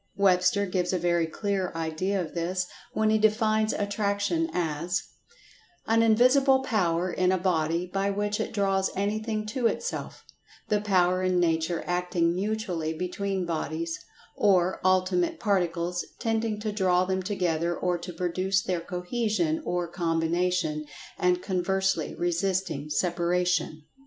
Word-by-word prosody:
Webster 190 Hz, 0 st, +3 dB
gives 180 Hz, -1 st, -1 dB
a -, -, +2 dB
very 170 Hz, -1 st, +1 dB
clear 195 Hz, +1 st, -2 dB
idea 165 Hz, +5 st, -1 dB
of 170 Hz, -4 st, -4 dB
this 180 Hz, +2 st, -1 dB, 0.3 s
when 220 Hz, 0 st, +2 dB
he 220 Hz, -, +3 dB
defines 215 Hz, 0 st, +2 dB
Attraction 205 Hz, +10 st, 0 dB
as: 170 Hz, +2 st, -1 dB, 0.8 s
"An 225 Hz, +1 st, +3 dB
invisible 260 Hz, +4 st, +4 dB
power 180 Hz, -7 st, +1 dB
in 185 Hz, 0 st, +2 dB
a 190 Hz, -, +2 dB
body 170 Hz, -2 st, 0 dB
by 195 Hz, +2 st, -1 dB
which 205 Hz, +1 st, -1 dB
it 220 Hz, -, -2 dB
draws 195 Hz, -3 st, +1 dB
anything 215 Hz, +2 st, -1 dB
to 235 Hz, +2 st, 0 dB
itself; 475 Hz, -, -4 dB, 0.4 s
the 210 Hz, -1 st, +2 dB
power 185 Hz, -3 st, +2 dB
in 185 Hz, -1 st, +2 dB
nature 165 Hz, 0 st, +1 dB
acting 175 Hz, -1 st, 0 dB
mutually 185 Hz, -5 st, -2 dB
between 185 Hz, +2 st, -2 dB
bodies, 165 Hz, 0 st, -3 dB, 0.4 s
or 185 Hz, -3 st, +2 dB
ultimate 185 Hz, -1 st, +2 dB
particles, 175 Hz, -3 st, 0 dB
tending 225 Hz, -1 st, -1 dB
to 215 Hz, -1 st, -2 dB
draw 185 Hz, -3 st, +2 dB
them 190 Hz, 0 st, -1 dB
together, 175 Hz, -3 st, -1 dB
or 180 Hz, -1 st, 0 dB
to 175 Hz, +1 st, -7 dB
produce 185 Hz, +3 st, 0 dB
their 180 Hz, -2 st, -1 dB
cohesion 180 Hz, -2 st, -1 dB
or 175 Hz, -1 st, -1 dB
combination, 165 Hz, -1 st, 0 dB, 0.4 s
and 180 Hz, 0 st, +2 dB
conversely 190 Hz, -2 st, 0 dB
resisting 175 Hz, -4 st, -1 dB
separation." 175 Hz, -2 st, 0 dB
185 Hz, 130 wpm, -27 LUFS, 175-205 Hz, 0.8 s, invisible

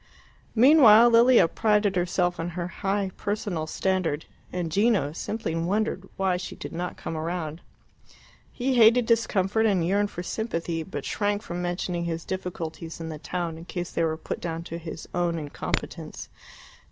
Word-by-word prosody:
Meanwhile 240 Hz, -3 st, +8 dB
Lilia 235 Hz, -4 st, +6 dB
prided 210 Hz, +1 st, +2 dB
herself 175 Hz, 0 st, 0 dB
on 165 Hz, +1 st, -2 dB
her 175 Hz, -1 st, -2 dB
high 195 Hz, +1 st, -2 dB
personal 200 Hz, -6 st, -2 dB
standard, 180 Hz, -3 st, -1 dB, 0.3 s
and 175 Hz, -3 st, -3 dB
Gino 200 Hz, -5 st, +2 dB
simply 210 Hz, 0 st, -3 dB
wondered 190 Hz, +3 st, -1 dB
why 190 Hz, -2 st, +1 dB
she 180 Hz, -, -6 dB
did -, -, -8 dB
not 175 Hz, +2 st, -4 dB
come 165 Hz, -, -5 dB
round. 160 Hz, 0 st, -3 dB, 0.9 s
He 260 Hz, +2 st, -1 dB
hated 230 Hz, +1 st, +6 dB
discomfort 220 Hz, -2 st, +2 dB
and 185 Hz, -5 st, +2 dB
yearned 200 Hz, +3 st, +1 dB
for 175 Hz, -, -6 dB
sympathy, 170 Hz, -6 st, -3 dB
but 190 Hz, -, -6 dB
shrank 205 Hz, 0 st, -1 dB
from 175 Hz, +1 st, -5 dB
mentioning 175 Hz, 0 st, -2 dB
his 165 Hz, -1 st, -3 dB
difficulties 170 Hz, -3 st, -5 dB
in 165 Hz, 0 st, -5 dB
the 155 Hz, -1 st, -6 dB
town 170 Hz, -1 st, -4 dB
in 165 Hz, -, -10 dB
case 175 Hz, -1 st, -5 dB
they -, -, -1 dB
were 160 Hz, -1 st, 0 dB
put 160 Hz, -, -5 dB
down 165 Hz, -1 st, -4 dB
to 170 Hz, 0 st, -6 dB
his 160 Hz, -1 st, -8 dB
own 175 Hz, -1 st, 0 dB
incompetence. 150 Hz, -3 st, -4 dB
180 Hz, 160 wpm, -26 LUFS, 165-205 Hz, 0.9 s, Meanwhile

